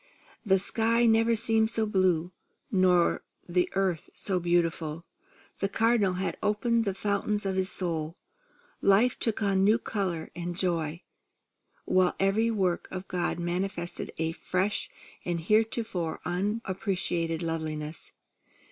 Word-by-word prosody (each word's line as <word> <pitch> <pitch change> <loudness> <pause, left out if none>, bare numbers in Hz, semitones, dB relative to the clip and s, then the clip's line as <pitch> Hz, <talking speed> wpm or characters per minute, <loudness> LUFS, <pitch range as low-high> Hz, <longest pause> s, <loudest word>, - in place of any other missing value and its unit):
The 195 -4 +4
sky 230 +4 +1
never 225 0 +4
had - - +1
seemed 220 0 +2
so 225 -1 0
blue, 185 -4 +1 0.4
or 180 -2 +3 0.2
the 180 0 +1
earth 190 -4 0
so 190 -2 0
beautiful. 170 -2 0 0.5
The 195 - 0
Cardinal 225 -3 +2
had 185 +1 -2
opened 225 +2 +1
the 195 -2 -1
fountains 205 +1 -1
of 190 -1 -1
his 190 0 +1
soul; 165 -4 -2 0.7
life 215 +6 +4
took 225 -1 +1
on 200 - +2
a - - +1
new 205 +4 +4
colour 185 -8 -3
and 175 0 -4
joy; 165 -3 -1 0.8
while 185 -1 +3
every 200 +4 +2
work 190 -6 0
of 185 0 -6
God 180 -2 -1
manifested 175 0 -2
a 160 0 0
fresh 185 +4 -1 0.3
and 175 -1 -2
heretofore 215 -2 0
unappreciated 185 -3 -1
loveliness. 155 -1 -4
185 Hz, 130 wpm, -28 LUFS, 170-210 Hz, 0.8 s, The